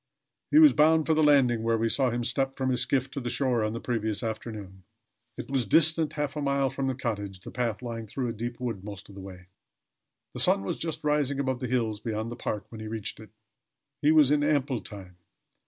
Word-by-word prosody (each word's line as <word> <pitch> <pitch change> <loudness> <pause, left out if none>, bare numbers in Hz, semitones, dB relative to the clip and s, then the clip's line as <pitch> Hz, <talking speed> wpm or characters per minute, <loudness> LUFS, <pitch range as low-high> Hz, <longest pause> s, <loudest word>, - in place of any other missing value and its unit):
He - - +4
was 310 -2 +8
bound 160 +1 +4
for 160 - +2
the 155 - +2
landing 135 -6 +4
where 115 0 +1
we 115 +1 +1
saw 130 +3 +2
him 120 0 -2
step 135 +3 0
from 130 -1 -1
his 125 -1 +2
skiff 130 +1 0
to 140 - -4
the 120 -2 -4
shore 125 -3 0
on 110 0 -1
the 115 - -4
previous 110 -2 -2
afternoon. 105 -4 -6 0.5
It - - -6
was 130 -6 0
distant 160 +4 +3
half 145 -1 -3
a 150 - -3
mile 140 -1 +1
from 135 0 -2
the 130 - -1
cottage, 105 -7 -4
the - - -9
path 120 -1 -2
lying 115 -2 -5
through 125 +4 -3
a 115 - -3
deep 120 +2 -5
wood 115 -7 -4
most 100 -1 -9
of - - -12
the 100 - -9
way. 90 -1 -11 0.9
The - - -5
sun 95 - +4
was 95 - -3
just 165 -1 -4
rising 145 -2 +1
above 130 -2 -1
the 125 - -3
hills 115 -4 -1
beyond 110 +1 -4
the - - -5
park 105 -3 -4
when 110 -2 -9
he 110 - -6
reached 110 -2 -5
it. 110 - -12 0.7
He 150 - +4
was 150 -3 +5
in 145 0 +3
ample 145 -5 +1
time. 95 -3 -11
120 Hz, 235 wpm, -27 LUFS, 110-140 Hz, 0.9 s, was